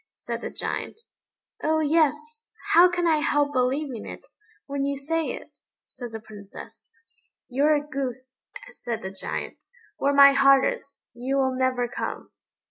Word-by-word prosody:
said -, -, -6 dB
the -, -, -4 dB
Giant. -, -, -5 dB, 0.6 s
"Oh 315 Hz, +1 st, +1 dB
yes; 310 Hz, -1 st, +3 dB, 0.6 s
how 350 Hz, +2 st, +8 dB
can 350 Hz, 0 st, -1 dB
I 320 Hz, -2 st, +4 dB
help 290 Hz, -1 st, +1 dB
believing 255 Hz, -1 st, -1 dB
it, -, -, -9 dB, 0.4 s
when 280 Hz, 0 st, -3 dB
you 280 Hz, 0 st, -1 dB
say 325 Hz, +4 st, -1 dB
it?" -, -, -8 dB, 0.3 s
said 245 Hz, -2 st, -8 dB
the 225 Hz, -, -6 dB
Princess. 210 Hz, -2 st, -12 dB, 0.6 s
"You're 285 Hz, +4 st, +3 dB
a 290 Hz, 0 st, -2 dB
goose," 260 Hz, -2 st, -5 dB, 0.4 s
said 235 Hz, -, -5 dB
the 190 Hz, -, -5 dB
Giant; 195 Hz, -, -5 dB, 0.4 s
"where 280 Hz, -, +1 dB
my 280 Hz, 0 st, +8 dB
heart 275 Hz, -1 st, +5 dB
is, 280 Hz, -, -5 dB
you 255 Hz, +3 st, -3 dB
will 265 Hz, -1 st, +2 dB
never 255 Hz, -1 st, 0 dB
come." -, -, -5 dB
275 Hz, 150 wpm, -25 LUFS, 255-295 Hz, 0.6 s, how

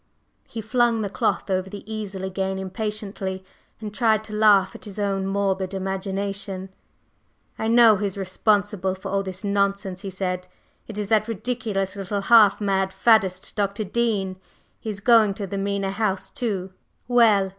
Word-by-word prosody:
…" -, -, -43 dB
He 225 Hz, -, -5 dB
flung 230 Hz, 0 st, +2 dB
the 200 Hz, -, -3 dB
cloth -, -, 0 dB
over 185 Hz, 0 st, 0 dB
the 200 Hz, +1 st, -8 dB
easel 210 Hz, -3 st, -5 dB
again 190 Hz, 0 st, -2 dB
impatiently, 190 Hz, -1 st, -4 dB, 0.3 s
and 210 Hz, -1 st, -6 dB
tried 220 Hz, -2 st, +2 dB
to 215 Hz, -, -9 dB
laugh 210 Hz, -3 st, +4 dB
at -, -, -10 dB
his 205 Hz, -1 st, -9 dB
own 195 Hz, -2 st, -1 dB
morbid 195 Hz, -1 st, -1 dB
imagination. 195 Hz, 0 st, -3 dB, 0.9 s
"I 220 Hz, -, -1 dB
know 230 Hz, -2 st, +6 dB
who 205 Hz, -, -2 dB
is 195 Hz, -1 st, -3 dB
responsible 195 Hz, 0 st, 0 dB
for 195 Hz, +1 st, -7 dB
all 195 Hz, 0 st, +1 dB
this 190 Hz, 0 st, -7 dB
nonsense," 200 Hz, -2 st, 0 dB
he 195 Hz, -, -5 dB
said. 185 Hz, -1 st, -3 dB, 0.4 s
"It 220 Hz, -, -7 dB
is 205 Hz, -1 st, -3 dB
that 215 Hz, -1 st, +3 dB
ridiculous 220 Hz, -3 st, -2 dB
little 200 Hz, +1 st, -3 dB
half 210 Hz, -2 st, +6 dB
mad 195 Hz, -2 st, 0 dB
faddist, 190 Hz, -5 st, +2 dB
Dr. 205 Hz, 0 st, -1 dB
Dean. 200 Hz, -3 st, -1 dB, 0.4 s
He 220 Hz, -, -6 dB
is 200 Hz, -1 st, -5 dB
going 220 Hz, -3 st, +5 dB
to 200 Hz, -, -4 dB
the 195 Hz, +1 st, -4 dB
Mena 195 Hz, 0 st, -1 dB
House, 195 Hz, -2 st, -2 dB
too. 190 Hz, -6 st, -3 dB, 0.3 s
Well! 220 Hz, -6 st, +4 dB
200 Hz, 165 wpm, -24 LUFS, 190-215 Hz, 0.9 s, know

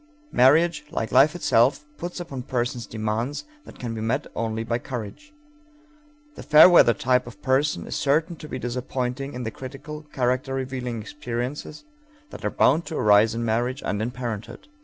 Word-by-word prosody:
Marriage, 155 Hz, +7 st, +4 dB
like 115 Hz, -, -3 dB
life 140 Hz, +6 st, +5 dB
itself, 135 Hz, -3 st, +2 dB
puts 175 Hz, +1 st, -5 dB
upon 140 Hz, -7 st, -6 dB
persons 120 Hz, 0 st, -3 dB
demands 110 Hz, -, -3 dB, 0.2 s
that -, -, -13 dB
can 120 Hz, -2 st, -5 dB
be 110 Hz, -, -5 dB
met 115 Hz, +3 st, -1 dB
only 115 Hz, 0 st, -2 dB
by 115 Hz, +1 st, -1 dB
courage. 125 Hz, -, -7 dB, 1.0 s
The -, -, -10 dB
fair 150 Hz, +3 st, +8 dB
weather 170 Hz, -10 st, +6 dB
type 125 Hz, -3 st, +1 dB
of 120 Hz, -, -11 dB
person 135 Hz, +3 st, +1 dB
is -, -, -5 dB
certain 155 Hz, +5 st, +1 dB
to 155 Hz, -, -10 dB
be -, -, -4 dB
disappointing 125 Hz, +2 st, -3 dB
in 125 Hz, -, -4 dB
the 110 Hz, -, -3 dB
critical, 145 Hz, +5 st, -8 dB
character 130 Hz, +1 st, 0 dB
revealing 130 Hz, -3 st, -4 dB
experiences 130 Hz, +3 st, -5 dB, 0.5 s
that -, -, -10 dB
are -, -, +1 dB
bound 155 Hz, +6 st, +2 dB
to 160 Hz, -, -4 dB
arise 105 Hz, +2 st, +4 dB
in 115 Hz, 0 st, -2 dB
marriage 120 Hz, +4 st, -1 dB
and 105 Hz, -, -1 dB
in 115 Hz, -, -1 dB
parenthood. 120 Hz, -4 st, -6 dB
125 Hz, 170 wpm, -24 LUFS, 115-145 Hz, 1.0 s, fair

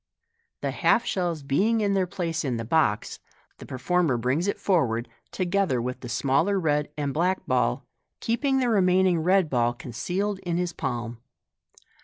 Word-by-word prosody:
The -, -, -1 dB
half 240 Hz, 0 st, +2 dB
shells 175 Hz, -5 st, -2 dB
being 205 Hz, +12 st, +1 dB
in 200 Hz, -1 st, +1 dB
their 190 Hz, -2 st, +1 dB
place 170 Hz, -3 st, -3 dB
in 130 Hz, -5 st, -1 dB
the 115 Hz, -, -4 dB
box, 120 Hz, -6 st, +1 dB, 0.4 s
the -, -, -10 dB
performer 150 Hz, +1 st, 0 dB
brings 130 Hz, -, 0 dB
it 200 Hz, -, -1 dB
forward, 125 Hz, -, +1 dB, 0.2 s
together 185 Hz, -7 st, 0 dB
with 125 Hz, +2 st, -4 dB
the 125 Hz, -, -8 dB
smaller 140 Hz, +11 st, +1 dB
red 150 Hz, -3 st, 0 dB
and 145 Hz, -2 st, -2 dB
black 180 Hz, +4 st, 0 dB
ball, 125 Hz, -, 0 dB, 0.3 s
keeping 265 Hz, +4 st, 0 dB
the 255 Hz, -2 st, +1 dB
remaining 185 Hz, -4 st, +3 dB
red 185 Hz, +2 st, +3 dB
ball 120 Hz, -3 st, +1 dB
concealed 180 Hz, -, -3 dB
in 175 Hz, -3 st, -2 dB
his 175 Hz, -1 st, -2 dB
palm. 120 Hz, -1 st, -4 dB
165 Hz, 160 wpm, -26 LUFS, 130-190 Hz, 0.4 s, remaining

